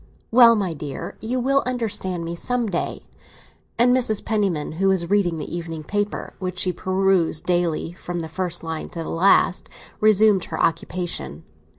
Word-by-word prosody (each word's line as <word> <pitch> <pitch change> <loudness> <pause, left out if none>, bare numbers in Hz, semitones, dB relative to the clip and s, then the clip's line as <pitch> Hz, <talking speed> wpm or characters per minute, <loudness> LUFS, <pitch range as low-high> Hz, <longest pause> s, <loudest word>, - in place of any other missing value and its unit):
"Well, 230 -1 +7
my 195 -5 -1
dear, 145 -2 -6
you 245 +3 -2
will 275 +2 +2
understand 210 -8 -2
me 170 - -4
some 245 +7 -1
day!" 190 -5 -3 0.7
And 245 +2 +5
Mrs. 235 -5 0
Penniman, 200 -8 0
who 195 - +3
was 185 -2 +1
reading 185 -5 +2
the 160 - -5
evening 165 -2 -5
paper, 205 +5 -3
which 185 -1 -4
she 180 0 +1
perused 185 -4 +1
daily 175 -2 0
from 175 -1 -5
the 160 - -5
first 175 +1 -3
line 160 -1 -5
to 165 - -5
the - - -6
last, 180 +1 +3 0.3
resumed 215 -2 +4
her - - -6
occupation. 165 - -2
185 Hz, 165 wpm, -22 LUFS, 170-215 Hz, 0.7 s, Well